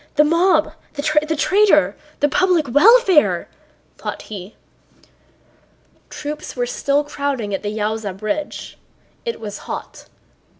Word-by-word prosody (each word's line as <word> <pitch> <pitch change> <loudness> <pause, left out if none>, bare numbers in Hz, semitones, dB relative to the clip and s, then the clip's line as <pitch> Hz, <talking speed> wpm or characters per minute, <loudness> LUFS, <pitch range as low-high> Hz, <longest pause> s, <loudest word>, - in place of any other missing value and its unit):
The 300 - +6
mob, 330 0 +3 0.2
the 285 -1 -5 0.3
traitor... 400 +6 +3 0.3
the 290 - +5
public 350 0 +2
welfare," 370 - +5 0.5
thought - - -5
he. 200 0 -9 1.5
Troops 300 0 -6
were 245 -1 0
still 280 +4 0
crowding 280 -8 -3
at 195 - -2
the 205 - -3
Yaúza 210 -2 -3
bridge. 215 +9 -4 0.5
It 465 - -3
was 210 -2 -7
hot. - - -7
290 Hz, 115 wpm, -20 LUFS, 220-325 Hz, 1.5 s, The